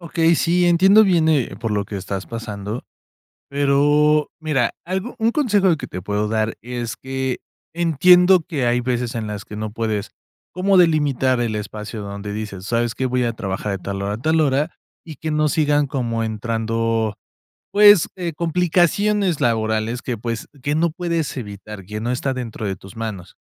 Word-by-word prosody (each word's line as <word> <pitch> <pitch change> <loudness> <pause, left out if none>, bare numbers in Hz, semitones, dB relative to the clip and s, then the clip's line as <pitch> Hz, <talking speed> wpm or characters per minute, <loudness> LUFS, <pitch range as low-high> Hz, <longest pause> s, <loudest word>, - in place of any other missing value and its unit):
Okey, 165 0 +2
sí, 175 +2 +2
entiendo 190 +5 +6
bien, 170 -5 +3
eh, 145 -6 +1
por 115 - -3
lo 105 -1 0
que 100 - -6
estás 95 0 -5
pasando, 110 -1 -5 0.7
pero, 145 +2 +3
mira, 145 -7 +1
algo 190 +7 -3
un 225 0 +2
consejo 210 -8 +2
de 165 - +3
que - - -7
te 90 - -6
puedo 105 +2 -1
dar 110 0 0
es 120 -1 -5
que, 130 -1 -3 0.4
entiendo 180 +3 +5
que 145 -8 -1
hay 120 +1 +2
veces 120 -1 -2
en 115 -2 -3
las 105 -1 -5
que 105 - -9
no 110 0 -4
puedes 110 -3 -2 0.4
como 190 +2 +2
delimitar 145 -7 +3
el 115 -2 -1
espacio 105 +1 -6
donde 100 0 -6
dices: 105 -3 -6
"¿Sabes 115 0 0
qué? 130 - -1
Voy 125 0 0
a 120 - 0
trabajar 100 -1 -3
de 100 - -3
tal 100 0 -4
hora 100 +1 -2
a - - -4
tal 160 +4 +2
hora", 145 +2 +1 0.3
y 160 -3 -9
que 160 +4 -4
no 150 0 +2
sigan 145 -1 +2
como 120 -5 -2
entrando, 115 0 -1 0.6
pues, 205 -3 +7
eh, 175 -3 -4
complicaciones 180 +3 +1
laborales 110 +1 0
que, 120 -3 -3
pues, 115 +1 -4 0.2
que 145 +2 0
no 170 +2 +2
puedes 170 -2 -2
evitar, 105 -3 -8
que 105 +3 -5
no 120 +2 -1
está 130 +2 -1
dentro 120 -4 -5
de 95 -1 -2
tus 95 +1 -14
manos. 110 -6 -6
125 Hz, 180 wpm, -21 LUFS, 110-160 Hz, 0.7 s, pues